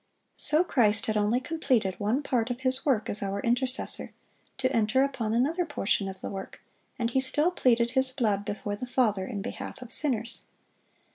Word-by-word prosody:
So 310 +3 +2
Christ 215 - +3
had 220 - -1
only 210 +3 +2
completed 255 - 0
one 225 +8 0
part 245 -3 0
of 245 +1 -4
His 260 +1 +1
work 235 -6 +1
as 205 - -2
our 200 0 -2
intercessor, 250 +4 0 0.4
to 260 -1 0
enter 230 +4 +3
upon 250 -6 -2
another 310 +9 +2
portion 210 - 0
of 190 0 -9
the - - -4
work, 195 -1 -7 0.4
and 235 -2 -1
He 265 - +2
still 295 +6 +2
pleaded 240 -8 +2
His 265 0 +2
blood 215 -6 0
before 205 0 -4
the 250 +5 -6
Father 215 -7 +1
in 200 -2 -4
behalf - - -6
of 250 -2 -10
sinners. 235 -6 0
240 Hz, 185 wpm, -28 LUFS, 210-265 Hz, 0.4 s, Christ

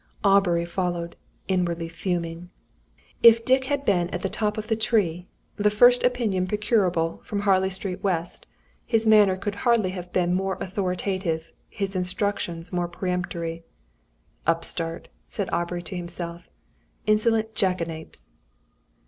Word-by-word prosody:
Aubrey 195 -4 +4
followed, 175 -1 -3 0.3
inwardly 175 -3 0
fuming. 170 0 -3 0.7
If 230 0 +7
Dick 260 0 +4
had 285 +1 -1
been 175 -3 +2
at 180 - -5
the 195 - -1
top 210 0 0
of 215 0 -4
the 225 - +1
tree, 190 -6 +1 0.3
the 210 0 +3
first 245 +4 +5
opinion 220 -7 +1
procurable 190 -5 +1
from 205 -1 -3
Harley 190 -2 +3
Street, 190 -1 -4
W., 175 -4 0 0.6
his 225 -2 +1
manner 210 -4 +6
could 205 +2 -3
hardly 230 -6 +3
have 180 -1 -7
been 175 -1 +1
more 190 +1 -1
authoritative, 185 -3 -2 0.2
his 195 -2 -3
instructions 180 -2 -2
more 175 -1 0
peremptory. 170 -2 -3 0.8
"Upstart!" 165 0 0 0.2
said - - -2
Aubrey 175 0 -1
to 175 - -6
himself. 175 -1 -5 0.6
"Insolent 220 +1 +2
Jackanapes!" 170 -5 -2
185 Hz, 130 wpm, -25 LUFS, 175-210 Hz, 0.8 s, If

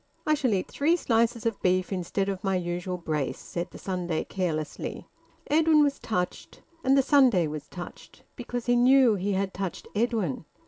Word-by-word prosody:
"I 310 - +3
shall 280 -5 +1
eat 185 - -2
three 310 +5 +2
slices 235 -6 +1
of 225 -3 -1
beef 185 +1 +1
instead 190 +2 -2
of 195 -2 -3
my 195 -1 +1
usual 180 +1 -3
brace," 155 -5 -2
said 175 +1 -5
the - - -11
Sunday 175 -4 -2
carelessly. 160 -5 -4 0.4
Edwin 310 0 +4
was 285 -1 0
touched. 180 -5 -4 0.2
And 270 +1 +4
the 270 - +4
Sunday 255 - +4
was 150 -1 -6
touched, 175 -1 -10
because 245 -1 -5
he 245 - +3
knew 250 -1 +5
he 200 0 -1
had 195 0 -1
touched 190 -3 -5
Edwin. 210 - -1
195 Hz, 175 wpm, -27 LUFS, 180-245 Hz, 0.4 s, knew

